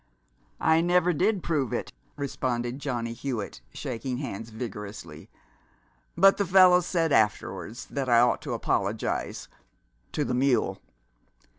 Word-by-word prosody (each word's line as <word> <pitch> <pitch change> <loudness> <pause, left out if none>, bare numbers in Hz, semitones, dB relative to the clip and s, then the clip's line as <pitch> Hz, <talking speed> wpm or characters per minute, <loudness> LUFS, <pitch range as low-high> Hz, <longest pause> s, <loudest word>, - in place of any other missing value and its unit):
"I 160 0 +4
never 180 0 +3
did 190 +4 +1
prove 145 -8 0
it," - - -3 0.2
responded 125 -2 -3
Johnny 120 -4 -3
Hewitt, 115 - -5
shaking 125 - -4
hands 115 -5 -5
vigorously, 105 -8 -8 0.9
"but 195 +3 +6
the 200 - +1
fellows 180 -1 +6
said 165 -3 +1
afterwards 110 +1 0
that 135 -2 -3
I 120 -1 +6
ought 120 +1 +3
to - - -4
apologize - - -2 0.7
to 150 - 0
the 125 - -2
mule. 125 -7 +1
130 Hz, 125 wpm, -27 LUFS, 115-165 Hz, 0.9 s, but